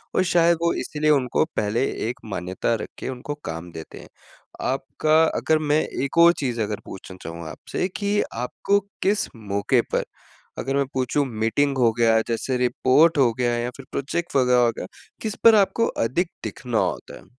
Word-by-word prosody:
और 185 Hz, -, +4 dB
शायद 170 Hz, -1 st, +3 dB
वो 170 Hz, -, +2 dB
इसलिए 155 Hz, 0 st, -1 dB
उनको 130 Hz, -4 st, +2 dB
पहले 105 Hz, +5 st, 0 dB, 0.3 s
एक 125 Hz, -, -5 dB
मान्यता 95 Hz, +2 st, -2 dB
रख -, -, -5 dB
के -, -, -5 dB
उनको 130 Hz, +3 st, -5 dB
काम 85 Hz, +1 st, -6 dB
देते 80 Hz, -1 st, -9 dB
हैं। -, -, -12 dB, 0.6 s
आपका 155 Hz, +4 st, +2 dB
अगर 160 Hz, -, +2 dB
मैं 150 Hz, 0 st, +2 dB, 0.2 s
एक 140 Hz, +4 st, -4 dB
और 170 Hz, +1 st, +8 dB
चीज़ 120 Hz, -5 st, -2 dB
अगर 105 Hz, 0 st, -2 dB
पूछना 95 Hz, -1 st, -10 dB
चाहूँ 85 Hz, 0 st, -7 dB
आपसे 180 Hz, -, -4 dB
कि 205 Hz, 0 st, +1 dB
आपको 125 Hz, -, 0 dB, 0.2 s
किस 205 Hz, +2 st, +1 dB
मौके 105 Hz, +3 st, 0 dB
पर, -, -, +1 dB, 0.6 s
अगर 135 Hz, +1 st, -2 dB
मैं 140 Hz, 0 st, +2 dB
पूछूँ 130 Hz, +2 st, 0 dB
मीटिंग 120 Hz, +5 st, 0 dB
हो 120 Hz, -3 st, +4 dB
गया, 115 Hz, -1 st, +5 dB
जैसे 120 Hz, +2 st, -1 dB
रिपोर्ट 130 Hz, +6 st, +3 dB
हो 125 Hz, -4 st, +4 dB
गया 120 Hz, 0 st, 0 dB
या 120 Hz, +1 st, -2 dB
फ़िर 135 Hz, -, -11 dB
प्रोजेक्ट 150 Hz, +4 st, -3 dB
वग़ैरह 125 Hz, -2 st, +4 dB
हो 120 Hz, -1 st, +3 dB
गया, -, -, -4 dB, 0.4 s
किस 215 Hz, -2 st, -3 dB
पर 225 Hz, -1 st, +8 dB
आपको 210 Hz, +3 st, +3 dB, 0.2 s
अधिक 170 Hz, +9 st, 0 dB, 0.2 s
दिखना 120 Hz, -4 st, -3 dB
होता -, -, -3 dB
है? -, -, -16 dB
130 Hz, 180 wpm, -23 LUFS, 115-155 Hz, 0.6 s, और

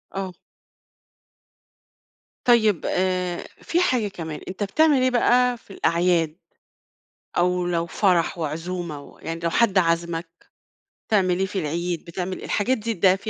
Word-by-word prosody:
آه. 190 Hz, -1 st, -3 dB, 2.1 s
طيب، 220 Hz, -7 st, +4 dB
آآ، 180 Hz, -1 st, -1 dB
فيه 340 Hz, -, 0 dB
حاجة 250 Hz, -11 st, +2 dB
كمان. 160 Hz, -5 st, -6 dB
أنت 190 Hz, +2 st, -4 dB
بتعمل 290 Hz, +7 st, +3 dB
إيه 255 Hz, -, +4 dB
بقى 250 Hz, 0 st, +3 dB
في 205 Hz, -, -15 dB
الأعياد؟ 170 Hz, -3 st, +1 dB, 1.0 s
أو 180 Hz, 0 st, +2 dB
لو 170 Hz, -1 st, 0 dB
فرح 175 Hz, -1 st, +1 dB
وعزومة، 165 Hz, -1 st, -5 dB
يعني 165 Hz, +1 st, -5 dB
لو 170 Hz, 0 st, 0 dB
حد 205 Hz, 0 st, +3 dB
عازمك، 170 Hz, -1 st, 0 dB, 0.8 s
بتعمل 185 Hz, -4 st, +2 dB
إيه 190 Hz, -, +1 dB
في 195 Hz, 0 st, -4 dB
العيد، 170 Hz, +1 st, -2 dB
بتعمل 180 Hz, +2 st, -5 dB
الحاجات 250 Hz, +5 st, +1 dB
دي 230 Hz, +2 st, -2 dB
ده 185 Hz, 0 st, +4 dB
بيبقى -, -, -3 dB
180 Hz, 130 wpm, -24 LUFS, 170-205 Hz, 2.1 s, طيب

